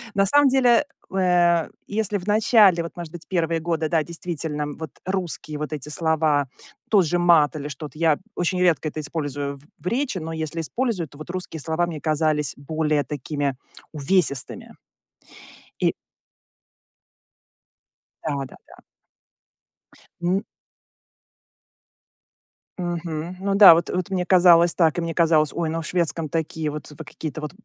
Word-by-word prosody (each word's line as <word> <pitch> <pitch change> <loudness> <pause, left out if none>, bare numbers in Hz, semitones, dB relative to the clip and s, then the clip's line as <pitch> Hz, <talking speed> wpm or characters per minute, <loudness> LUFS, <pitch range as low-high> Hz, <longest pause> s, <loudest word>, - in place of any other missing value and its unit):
На 195 0 +3
самом 285 +6 +5
деле, 255 0 +4 0.3
э, 175 -3 +3 0.2
если 210 -1 -1
в 180 - -10
начале, 210 -4 +5
вот, 170 - -8
может 170 -2 -7
быть, 175 -1 -10
первые 165 -3 0
годы, 165 -1 -1
да, 160 0 +2
действительно, 160 -2 -4
вот 160 -2 -6
русские 180 -5 -3
вот 150 +1 -5
эти 150 -1 -5
слова, 155 -2 +1 0.4
тот 200 -4 +5
же 175 +3 0
мат 165 -4 +4
или 145 -1 -5
что-то, 150 +2 -8
я 160 -3 +3 0.2
очень 180 +1 -1
редко 170 -3 +2
это 155 - -5
использую 145 -2 -4
в 135 - -22 0.2
в 170 - -16
речи, 250 0 -1
но 165 -1 -5
если 160 +1 -4
использую, 205 - -2
то 145 - -16
вот 155 - -9
русские 180 -3 -5
слова 160 +3 0
мне 160 -3 -6
казались 155 -2 0
более 150 +1 -1
такими 145 -1 -3 0.4
увесистыми. 150 -3 -1 1.1
И - - +2 2.3
Да-да-да. 140 -3 -6 1.4
Н 180 +3 0 2.4
Мгм, 175 -1 -4
ну 195 0 0
да, 200 -5 +10
вот 170 +1 -1
вот 180 -1 -2
мне 180 -2 0
казалось 175 -2 +6
так, 165 -1 +2
и - - +2
мне 165 -1 -3
казалось: 160 -3 +3
"Ой, 170 -2 -2
ну, 165 +1 -2
в - - -7
шведском 170 -2 -1
такие 160 0 -2
вот 150 -1 -7
в 150 - -14
какие-то 155 -1 -6
вот 150 -1 -5
165 Hz, 145 wpm, -23 LUFS, 150-180 Hz, 2.4 s, да